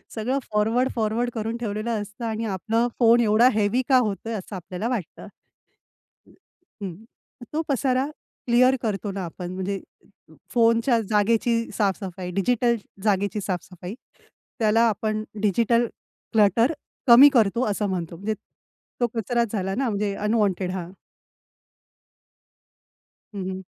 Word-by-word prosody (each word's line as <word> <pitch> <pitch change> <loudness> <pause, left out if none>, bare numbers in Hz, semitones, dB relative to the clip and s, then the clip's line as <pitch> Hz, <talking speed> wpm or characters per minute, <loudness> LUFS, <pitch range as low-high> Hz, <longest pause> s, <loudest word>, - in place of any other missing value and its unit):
सगळं 250 +5 -1
forward, 225 +5 +2
forward 225 +2 0
करून 225 +1 -3
ठेवलेलं 215 0 -2
असतं 205 +3 -7
आणि 225 0 -2
आपलं 225 +4 0
फोन 235 0 +6
एवढा 220 +2 +5
हेवी 215 +4 +2
का 260 - +6
होतोय? 225 -2 -1
असं 200 -1 -6
आपल्याला 185 +4 -5
वाटतं. 215 -10 -4 1.6
हं. 180 -4 -4 0.6
तो 315 - +1
पसारा 265 -1 +1 0.4
क्लिअर 255 +2 +5
करतो 210 -2 -2
ना 195 -1 -4
आपण 175 +1 -7
म्हणजे 190 +1 -3 0.7
फोनच्या 230 0 +3
जागेची 220 +3 +2 0.2
साफ-सफाई, 190 -3 -2
डिजिटल 235 +5 +2 0.3
जागेची 205 -1 +1
साफ-सफाई. 180 0 -5 0.7
त्याला 220 +1 +3
आपण 215 +1 -2 0.2
डिजिटल 230 +3 +2 0.5
क्लटर 225 - +4 0.3
कमी 255 +5 +10
करतो 235 0 +3
असं 205 0 -1
म्हणतो. 170 -3 -3
म्हणजे 200 +5 -2 0.7
तो 240 - +2
कचराच 235 0 0
झाला 195 -3 -2
ना, 265 0 0
म्हणजे 205 -1 -1
अनवॉन्टेड 205 -4 0
हां. 180 -1 -5 2.4
हं, 190 -1 -3
हं. 190 0 -5
215 Hz, 120 wpm, -24 LUFS, 195-235 Hz, 2.4 s, कमी